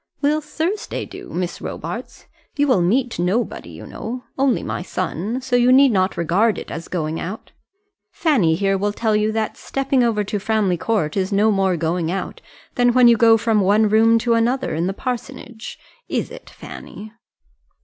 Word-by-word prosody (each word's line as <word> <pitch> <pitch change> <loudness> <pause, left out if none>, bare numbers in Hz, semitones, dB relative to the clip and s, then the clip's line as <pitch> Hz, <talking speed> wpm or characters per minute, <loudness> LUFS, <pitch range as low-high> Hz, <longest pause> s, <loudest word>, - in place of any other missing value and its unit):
"Will 300 +2 +1
Thursday 325 +7 -3
do, - - -11
Miss 175 0 -4
Robarts? - - -7 0.3
You 290 - +3
will 255 -9 +3
meet 235 +7 0
nobody 190 +7 -1
you - - -10
know, 245 +3 -6
only 270 -3 +1
my - - -3
son; 185 +6 -3
so 255 -1 -1
you 245 +1 +4
need 270 0 +6
not 190 -2 +1
regard 190 +7 +2
it - - -8
as 165 0 -6
going 160 -2 -3
out. 195 +6 -7 0.6
Fanny 220 - +2
here 195 +2 0
will 205 +1 -1
tell 220 -1 0
you 210 +1 +1
that 220 -1 -2
stepping 270 -1 0
over 220 -3 +1
to 205 +1 -3
Framley 210 -3 +1
Court 175 -4 -1
is 190 0 -1
no 210 +2 +3
more 190 -3 +1
going 165 +1 -1
out, 195 - -5 0.3
than 245 -1 +3
when 250 -1 +6
you 235 - +7
go 225 0 +5
from 220 -1 +1
one 205 +3 +3
room 225 +2 +5
to 235 +1 +1
another 240 +4 +1
in 165 +3 -1
the 195 - -2
parsonage. 240 -1 -6 0.3
Is - - -2
it, - - -11
Fanny?" 215 +1 -11
220 Hz, 180 wpm, -20 LUFS, 190-245 Hz, 0.6 s, you